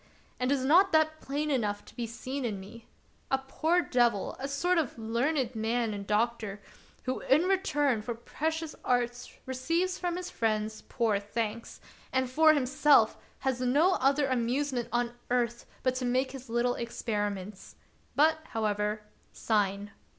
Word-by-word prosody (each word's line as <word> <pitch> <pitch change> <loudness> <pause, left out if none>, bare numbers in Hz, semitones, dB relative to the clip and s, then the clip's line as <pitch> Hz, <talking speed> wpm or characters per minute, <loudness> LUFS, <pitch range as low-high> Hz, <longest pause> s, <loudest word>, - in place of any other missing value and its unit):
"And 250 +1 +1
is 270 -2 +1
not 365 +7 +5
that 315 0 +3
plain 295 +2 -2
enough 210 -6 -1
to - - -16
be 240 -2 -3
seen 255 +4 -5
in 215 -5 -2
me.^ 215 +4 -12 0.4
A 270 - +3
poor 320 +6 +1
devil, 240 -5 +1
a 270 - -3
sort 340 +6 +1
of 290 -7 -2
learned 240 +3 0
man 225 0 0
and 200 -1 -6
doctor, 215 -1 0 0.4
who 255 0 -2
in 295 +5 +3
return 295 - +1
for 235 +2 -4
precious 315 +6 -3
arts 245 -1 0 0.2
receives 330 +9 -1
from 350 -1 -1
his 365 - -5
friends 215 -1 -1
poor 225 -5 +1
thanks, 220 +2 -4 0.3
and, 260 -1 0
for 310 +3 +6
himself, 275 -3 +4 0.3
has 260 -2 -1
no 290 +9 +4
other 280 -2 +2
amuse 260 +2 0
ment 240 -2 -2
on 240 0 0 0.2
earth 240 -1 0 0.2
but 255 - +2
to 255 0 -3
make 255 +2 +1
his 260 -2 -9
little 240 +1 +1
experiments. 205 -4 -4 0.4
But, 315 +2 +4
however, 210 -3 -1 0.3
sign. 205 -2 0
250 Hz, 155 wpm, -30 LUFS, 225-285 Hz, 0.4 s, for